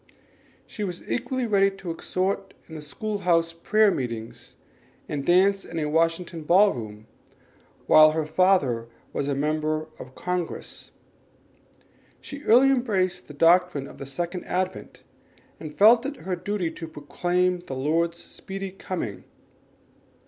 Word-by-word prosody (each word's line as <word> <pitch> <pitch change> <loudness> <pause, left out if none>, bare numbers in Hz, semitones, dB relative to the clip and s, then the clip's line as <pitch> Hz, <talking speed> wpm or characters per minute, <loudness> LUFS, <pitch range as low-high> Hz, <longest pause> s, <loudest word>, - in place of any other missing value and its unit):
She 210 - -6
was 180 -3 -5
equally 250 +1 -2
ready 200 -3 +3
to 195 -3 -7
exhort 190 +4 -2
in 160 -2 -8
school 205 +8 -4
house 165 -3 +2
prayer 215 +5 +3
meetings 115 -6 -5 0.5
and 145 -2 -3
dance 195 +4 +3
in 165 - -8
a 155 - 0
Washington 165 +1 0
ball 190 +6 +5
room, 110 -2 -8 0.8
while 155 0 +8
her 160 -1 -1
father 150 -10 +2 0.3
was 140 - -2
a 140 - 0
member 155 +2 -1
of 130 0 -11
Congress. 180 -2 -4 1.3
She 285 0 -9
early 255 +4 +6
embraced 205 -8 0
the 150 - -11
doctrine 170 -2 +3
of - - -13
the 135 - -7
Second 175 +6 -4
Advent, 185 +1 -4 0.6
and 155 -1 -9
felt 225 +4 +7
it 280 - -5
her 185 -1 -1
duty 180 -1 -2
to 165 0 -8
proclaim 180 +4 -1
the 155 -6 -7
Lord's 165 +5 0
speedy 195 0 -7
coming. 145 - -5
175 Hz, 135 wpm, -25 LUFS, 155-195 Hz, 1.3 s, while